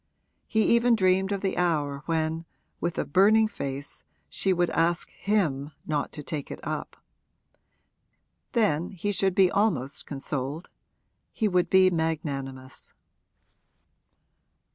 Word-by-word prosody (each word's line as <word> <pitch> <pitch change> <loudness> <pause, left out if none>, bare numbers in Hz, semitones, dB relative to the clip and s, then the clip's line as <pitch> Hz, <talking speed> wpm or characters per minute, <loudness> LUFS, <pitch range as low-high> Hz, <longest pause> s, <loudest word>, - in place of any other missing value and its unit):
He 220 -1 +2
even 235 0 +4
dreamed 190 -1 +2
of 200 -1 -1
the 195 - -1
hour 150 -5 0
when, 160 0 -1 0.3
with 170 0 -2
a - - 0
burning 215 +7 +5
face, 140 -8 -6 0.3
she 190 - 0
would 175 -1 +1
ask 170 +1 +1
him 155 -8 -1
not 150 -2 -1
to 150 - -7
take 150 -2 -5
it - - -7
up. - - -4 1.6
Then 180 - +1
he 195 +3 -2
should 195 -2 +1
be 190 -3 +5
almost 155 - 0
consoled 140 +3 -4 0.6
he 220 - 0
would 180 -3 +1
be 190 -1 +5
magnanimous. 140 -5 -4
170 Hz, 120 wpm, -27 LUFS, 145-195 Hz, 1.6 s, burning